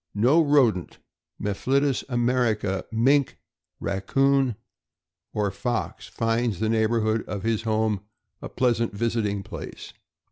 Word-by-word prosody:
No 125 +11 +4
rodent, 130 - +2 0.4
Mephitis 135 +7 0
Americana, 120 -6 0
mink, 130 +5 +2 0.4
raccoon, 135 +6 +1 0.8
or 105 -2 -1
fox 100 +6 -3
finds 115 -3 -1
the 110 - 0
neighborhood 110 0 +1
of 100 -2 -4
his 115 -1 0
home 110 -2 0 0.4
a - - -6
pleasant 115 -3 0
visiting 105 -3 -1
place. - - -9
115 Hz, 105 wpm, -25 LUFS, 105-125 Hz, 0.8 s, No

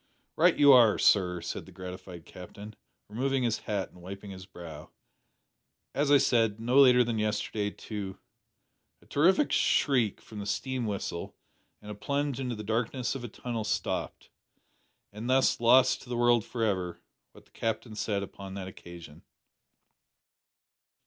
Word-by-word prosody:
"Right - - +4
you 145 -1 +8
are, 120 -4 +6
sir," 90 -3 +3
said 85 - -6
the - - -13
gratified 90 -2 -9
Captain, 100 +4 -11 0.3
removing 130 +5 -1
his 115 -2 0
hat 100 -3 -3
and 90 - -17
wiping 100 +2 -8
his 95 0 -10
brow. 80 -5 -10 1.0
"As 140 +1 0
I 145 - +7
said, 115 -5 +2
no 120 +4 +3
later 125 -2 +7
than 115 -2 -2
yesterday 105 -1 -1
to 100 -2 -7 0.4
" - - -51
A - - -22
terrific 185 - +3
shriek 125 -8 +2
from 110 - -11
the 100 - -5
steam 130 -1 -2
whistle, 100 -4 -4 0.5
and 105 - -8
a - - -4
plunge 140 +5 -2
into 125 -3 -3
the 105 - -7
darkness 115 +4 -1
of 135 -3 -6
a - - -4
tunnel 115 0 -5
stopped 105 0 -3 0.8
and 110 +4 -6
thus 130 +1 +3
lost 125 +2 +5
to 120 - -14
the 120 - -2
world 120 -2 +4
for 115 +1 -4
ever 90 -5 -1 0.3
what - - -17
the - - -29
Captain 115 0 -3
said 100 -2 -1
upon 95 0 -9
that 95 -2 -6
occasion. 85 -4 -12
110 Hz, 160 wpm, -29 LUFS, 95-125 Hz, 1.0 s, you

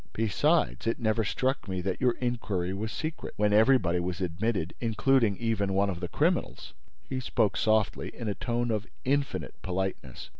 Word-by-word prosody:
Besides, 100 - +1
it 115 - +1
never 110 -1 +1
struck 130 +5 -1
me 95 -1 -2
that 95 +1 -3
your 125 -2 +4
inquiry 110 -7 -2
was 105 +3 -3
secret, 155 0 -5
when 105 0 +2
everybody 105 -6 +4
was 90 0 -3
admitted—including 105 +5 +1
even 100 -4 0
one 100 0 +2
of 85 - -5
the 90 - -3
criminals!" - - -1 0.3
He 130 - -2
spoke 110 -5 +1
softly, 110 -1 +1
in 115 - -5
a 105 - 0
tone 120 +2 -1
of 110 -1 -2 0.2
infinite 140 +1 0
politeness. 95 -8 -4
105 Hz, 160 wpm, -29 LUFS, 95-120 Hz, 0.3 s, your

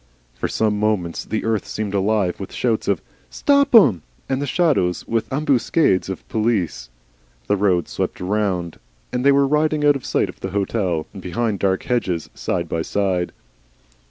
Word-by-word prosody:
For 65 - -3
some 105 -2 0
moments 105 -6 -1
the 110 - -3
earth 110 -2 0
seemed 105 -2 -4
alive 100 -2 +1
with 95 - -7
shouts 115 -3 -1
of, 100 -4 0 0.3
"Stop 280 -2 +3
'em!" 125 - +7 0.3
and 135 +1 -1
the 145 - -2
shadows 140 - +1
with 115 -1 -1
ambuscades 135 - +2
of 95 - -6
police. 105 - -1 0.6
The 105 - +2
road 95 -4 +1
swept - - -3
round, 90 -3 -1 0.3
and 125 0 -1
they 140 - +6
were 140 0 +4
riding 150 +1 +1
out 145 -1 +5
of 140 - -5
sight - - 0
of - - -11
the 95 - -4
hotel, 95 -6 -1
and 95 - -9
behind 100 +3 -2
dark 95 0 +1
hedges, 95 -10 -1
side - - -2
by 85 - -2
side. 95 -1 -1
105 Hz, 170 wpm, -21 LUFS, 90-125 Hz, 0.6 s, em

